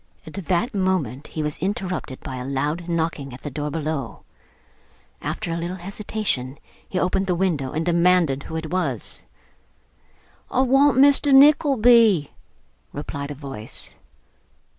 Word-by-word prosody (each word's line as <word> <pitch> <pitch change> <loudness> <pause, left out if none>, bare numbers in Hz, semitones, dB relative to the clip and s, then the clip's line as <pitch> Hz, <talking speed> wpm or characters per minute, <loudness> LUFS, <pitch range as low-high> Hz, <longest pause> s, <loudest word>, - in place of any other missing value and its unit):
At - - -10
that 195 +4 -1
moment, 185 - -1
he 155 - -4
was 150 -1 -3
interrupted 185 -7 -3
by 130 - -6
a 125 - -5
loud 145 +6 -2
knocking 160 -5 -2
at 125 - -15
the 145 - -5
door 150 +2 -3
below. 150 -5 -4 1.0
After 170 - -4
a 165 - -2
little 170 +2 -4
hesitation 190 -8 -3 0.3
he 185 - -3
opened 190 +1 0
the 180 - +1
window, 165 -8 -1
and 160 +1 -2
demanded 170 -5 +3
who 160 - -8
it 160 -1 -4
was. 155 - 0 1.2
'I 255 - +1
want 270 0 +4
Mr. 280 +1 +5
Nickleby,' 245 - +5 0.6
replied 145 0 -5
a 145 - -5
voice. 135 -6 -7
170 Hz, 140 wpm, -23 LUFS, 145-195 Hz, 1.2 s, Mr